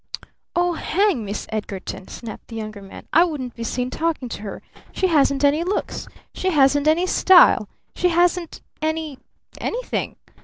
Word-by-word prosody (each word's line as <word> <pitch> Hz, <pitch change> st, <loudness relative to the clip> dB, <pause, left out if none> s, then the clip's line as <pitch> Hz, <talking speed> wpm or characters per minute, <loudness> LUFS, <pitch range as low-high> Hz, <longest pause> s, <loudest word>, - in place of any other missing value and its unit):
"Oh, 350 Hz, 0 st, +2 dB
hang 370 Hz, -, +1 dB
Miss 205 Hz, 0 st, -4 dB
Edgarton!" 200 Hz, -3 st, -5 dB
snapped 230 Hz, -2 st, -9 dB
the 230 Hz, -, -9 dB
Younger 215 Hz, -2 st, -6 dB
Man. 195 Hz, -, -12 dB
"I 330 Hz, -, +7 dB
wouldn't 285 Hz, -8 st, -3 dB
be 230 Hz, -, -7 dB
seen 250 Hz, +2 st, -2 dB
talking 315 Hz, -6 st, -2 dB
to 205 Hz, -, -6 dB
her! 205 Hz, -2 st, -7 dB, 0.3 s
She 380 Hz, -, -1 dB
hasn't 285 Hz, -5 st, +3 dB
any 290 Hz, +3 st, +3 dB
looks! 380 Hz, +4 st, -3 dB, 0.3 s
She 375 Hz, -, -1 dB
hasn't 290 Hz, -2 st, +3 dB
any 325 Hz, +4 st, +3 dB
style! 370 Hz, 0 st, +5 dB, 0.2 s
She 360 Hz, -, +1 dB
hasn't 345 Hz, 0 st, +1 dB, 0.2 s
any 315 Hz, -3 st, -2 dB, 0.4 s
anything! -, -, -3 dB
300 Hz, 155 wpm, -22 LUFS, 235-345 Hz, 0.4 s, I